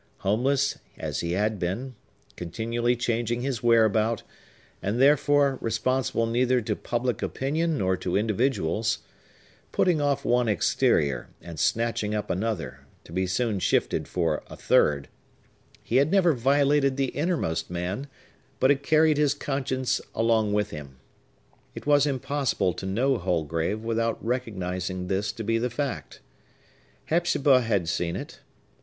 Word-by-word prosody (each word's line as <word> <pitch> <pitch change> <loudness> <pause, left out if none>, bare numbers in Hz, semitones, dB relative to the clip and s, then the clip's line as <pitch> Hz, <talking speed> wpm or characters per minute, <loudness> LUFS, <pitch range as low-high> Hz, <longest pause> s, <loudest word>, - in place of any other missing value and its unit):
Homeless 135 +7 +1 0.2
as - - -3
he 85 0 -2
had 105 +2 0
been,—continually 115 +2 -3
changing 120 0 -1
his 130 -4 -2
whereabout, 115 -1 +3 0.6
and, 100 +6 -1
therefore, 145 0 +4
responsible 115 +1 0
neither 125 +2 +2
to 110 -2 -2
public 120 +2 -2
opinion 155 +4 -1
nor 95 -2 +1
to 90 0 -1
individuals,—putting 115 - -1
off 140 -1 0
one 120 0 +2
exterior, 70 - +1
and 85 -3 -9
snatching 115 -2 0
up 105 -1 -2
another, 100 -1 -3 0.2
to - - -15
be 95 +2 -1
soon 105 +2 0
shifted - - 0
for 80 -4 -1
a - - -10
third,—he 75 - -2
had 140 +3 +4
never 185 -4 +4
violated 140 +2 +2
the 135 -2 +1
innermost 140 - -1
man, 90 +10 -3 0.5
but 130 - +5
had 140 -1 +1
carried 155 0 +3
his 145 -1 +3
conscience 130 -2 -1
along 110 -2 +2
with 105 0 0
him. 70 -4 -9 0.8
It - - -8
was 145 0 +4
impossible 135 -8 0
to 95 - -6
know 125 +6 +1
Holgrave 85 +3 -1
without 115 0 0
recognizing 95 -7 -3
this 100 +2 -1
to 115 - -6
be 115 +1 +1
the 125 +2 -1
fact. 135 +2 -4 0.8
Hepzibah 150 -6 +3
had 100 -7 0
seen 85 0 -1
it. - - -7
115 Hz, 130 wpm, -26 LUFS, 95-135 Hz, 0.8 s, but